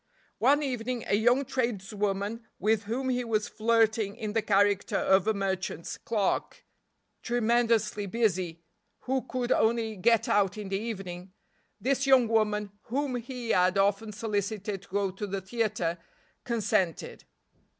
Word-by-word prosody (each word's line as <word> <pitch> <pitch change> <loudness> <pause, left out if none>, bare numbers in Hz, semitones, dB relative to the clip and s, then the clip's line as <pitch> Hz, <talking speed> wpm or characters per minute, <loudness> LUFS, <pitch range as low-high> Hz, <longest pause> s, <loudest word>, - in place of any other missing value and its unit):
One 285 +5 +4
evening 250 -2 -2
a - - -1
young 240 +6 +3
tradeswoman 210 -3 -2 0.2
with 215 +2 +1
whom 255 +5 -2
he 250 -1 0
was 215 -3 0
flirting 220 -2 +1
in 215 -3 -4
the 225 - +2
character 205 -1 +2
of 190 +1 +3
a 220 - +3
merchant's 190 -3 -3
clerk, 210 -4 -2 0.6
tremendously 230 -3 +1
busy, 185 -6 -1 0.4
who 265 +1 -1
could 255 -1 -3
only 225 -1 +2
get 230 +4 +3
out 200 0 +2
in 205 -2 -6
the 195 0 -1
evening; 190 -5 -6 0.5
this 275 +1 0
young 260 -3 +6
woman, 210 -2 +1
whom 270 +3 -1
he 245 -1 -4
had 185 +1 +3
often 200 +2 +1
solicited 205 -1 -3
to - - -18
go 200 0 0
to 200 +2 -5
the 195 0 -3
theater, 190 -5 -1 0.5
consented. 200 -7 -1
215 Hz, 140 wpm, -28 LUFS, 195-235 Hz, 0.6 s, young